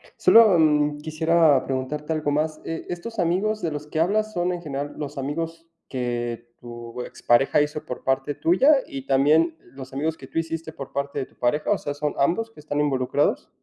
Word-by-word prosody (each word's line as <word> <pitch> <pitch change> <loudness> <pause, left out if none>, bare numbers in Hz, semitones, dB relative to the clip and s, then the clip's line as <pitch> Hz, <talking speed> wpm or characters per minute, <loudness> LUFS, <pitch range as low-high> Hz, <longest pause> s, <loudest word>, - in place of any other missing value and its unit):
sólo, 220 -6 +6
mm, 150 -2 +3
quisiera 160 -2 +3
preguntarte 145 +4 -3
algo 155 -2 -1
más, 155 +1 -1
eh, 165 0 -5
estos 200 +5 -6
amigos 195 +6 +1
de 165 - -1
los 150 0 -5
que 155 +1 -4
hablas, 215 +5 +1
¿son 180 -1 -1
en 175 - -5
general 145 -2 -4
los 145 -1 -6
amigos 165 +4 -4 0.2
que 120 -2 -4
tu 120 0 -8
expareja 125 +4 +2
hizo 150 +1 -2
por 125 - -7
parte 135 +2 0
tuya 310 - +4
y 135 -1 -7
también 155 +4 +3 0.2
los 130 -1 -10
amigos 155 +4 -2
que - - -11
tú - - -2
hiciste 165 0 -4
por 135 -3 -9
parte 140 0 -2
de 130 - -2
tu - - -26
pareja, 135 +8 0
o 205 - +3
sea, 145 - -4
son 150 +1 -2
ambos 180 +11 +1
que 225 - -15
están 145 -1 -3
involucrados? 135 -4 0
150 Hz, 195 wpm, -24 LUFS, 135-165 Hz, 0.2 s, sólo